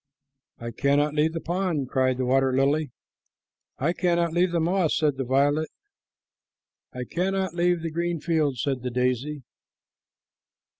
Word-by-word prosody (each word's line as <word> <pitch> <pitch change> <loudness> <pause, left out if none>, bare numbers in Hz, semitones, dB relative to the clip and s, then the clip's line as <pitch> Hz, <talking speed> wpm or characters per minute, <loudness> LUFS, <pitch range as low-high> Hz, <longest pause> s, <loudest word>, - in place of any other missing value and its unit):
"I 115 0 -6
cannot 145 +5 +1
leave 155 +1 +1
the 165 - -3
pond," 175 -6 -1
cried 130 -2 +1
the 130 - -1
water 135 +1 +2
lily. 140 +3 +1 0.9
"I 155 +6 0
cannot 170 -2 +1
leave 175 +1 +2
the 170 - +1
moss," 170 0 +1
said 150 -4 +1
the 135 - -1
violet. 145 +4 +1 1.2
"I 125 - -5
cannot 190 +5 -1
leave 175 -1 +1
the 165 - -3
green 170 +1 -2
fields," 150 -6 0
said 135 -3 -1
the 125 - -3
daisy. 125 +4 -1
150 Hz, 145 wpm, -25 LUFS, 130-170 Hz, 1.2 s, water